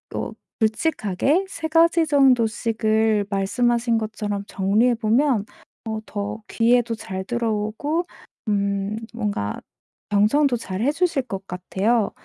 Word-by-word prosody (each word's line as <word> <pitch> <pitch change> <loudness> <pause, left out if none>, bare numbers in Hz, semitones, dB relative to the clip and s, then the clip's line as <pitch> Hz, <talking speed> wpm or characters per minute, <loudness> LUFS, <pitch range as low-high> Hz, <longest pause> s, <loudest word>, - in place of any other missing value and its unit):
어 - - -3 0.3
굵직하게 220 - +1
3 330 -4 -4
가지 330 +1 +4
정도씩을 225 -5 +2
말씀하신 235 +4 +1
것처럼 210 -2 -3
정리해 210 +6 +2
보면 230 0 +2 0.4
어 220 0 -2
더 205 +1 -5
귀에도 235 0 +2
잘 190 -3 -5
들어오고 235 - -1 0.4
음 200 0 0 0.2
뭔가 205 - -2 0.5
경청도 230 +7 +3
잘해주실 270 - 0
것 195 -5 -6
같아요. 200 +5 0
220 Hz, 230 characters per minute, -23 LUFS, 205-250 Hz, 0.5 s, 가지